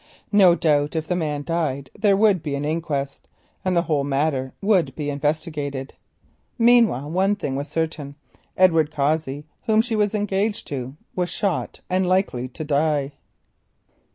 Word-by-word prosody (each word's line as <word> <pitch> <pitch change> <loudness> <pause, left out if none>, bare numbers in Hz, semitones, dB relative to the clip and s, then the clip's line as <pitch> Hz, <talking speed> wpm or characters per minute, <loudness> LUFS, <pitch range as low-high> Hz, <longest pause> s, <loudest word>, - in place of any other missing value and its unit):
No 190 -4 +6
doubt 150 -2 +1
if 160 0 -2
the 180 - 0
man 150 -4 -2
died 145 -5 -2
there 205 -2 +3
would 205 -4 +4
be 145 -2 -3
an 140 +1 -3
inquest, 150 -3 -3 0.4
and 185 -2 +1
the 170 - +3
whole 150 -5 0
matter 135 -1 0
would 185 -9 +2
be 145 -2 -3
investigated. 145 -2 -3 0.6
Meanwhile 230 - +4
one 190 +4 +2
thing 140 -9 -3
was 140 +2 -3
certain, 160 -4 -3 0.4
Edward 165 -5 +4
Cossey, 150 -1 -1 0.2
whom 220 -1 +4
she 230 0 +1
was 210 0 +1
engaged 205 +1 -1
to, 130 -1 -5 0.2
was 180 -1 -1
shot 195 -5 -2
and 185 0 +1
likely 180 -10 +1
to 130 +5 -7
die. 145 -1 +1
155 Hz, 155 wpm, -23 LUFS, 145-185 Hz, 0.6 s, No